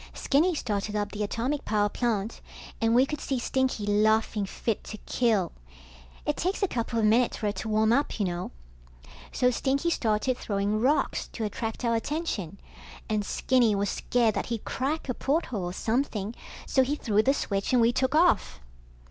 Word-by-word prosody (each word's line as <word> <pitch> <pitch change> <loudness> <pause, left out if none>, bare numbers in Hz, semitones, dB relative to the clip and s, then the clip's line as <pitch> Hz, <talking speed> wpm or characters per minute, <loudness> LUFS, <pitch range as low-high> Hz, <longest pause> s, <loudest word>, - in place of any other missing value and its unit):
Skinny 325 +6 +2
started 210 -5 -2
up 205 -1 -1
the 210 - -5
atomic 245 +7 -1
power 210 -1 +1
plant, 220 -1 -2 0.4
and 225 0 +3
we 255 +2 +6
could 300 +1 -5
see 270 - -1
Stinky 255 -3 0
laughing 215 0 +2
fit 220 +2 -2
to 215 - -7
kill. 215 -8 +1 0.7
It - - 0
takes 375 +4 -1
a - - +4
couple 230 -5 -2
of 220 - +2
minutes 230 +3 +3
for - - -4
it 205 0 -1
to 220 - -4
warm 220 +1 +3
up, 280 -2 0
you 205 - +2
know. 175 -1 -3 0.8
So 250 0 +2
Stinky 275 +6 0
started 230 0 0
throwing 205 +1 -1
rocks 280 +5 +1
to 225 - -4
attract 225 +3 -3
our 230 - +2
attention, 225 - -3 0.5
and 215 -1 +1
Skinny 240 0 +2
was 200 -1 0
scared 235 -3 +1
that - - -2
he'd 230 -3 -4
crack 285 +5 -2
a 250 - 0
porthole 255 - -1
or 175 - -3
something, 220 -1 -1 0.3
so 265 - +3
he 270 +3 +1
threw 215 -7 +2
the 270 +5 +2
switch 200 -6 -2
and 250 - +4
we 230 +1 +4
took 260 +3 +1
off. 330 - +3
230 Hz, 180 wpm, -27 LUFS, 210-260 Hz, 0.8 s, we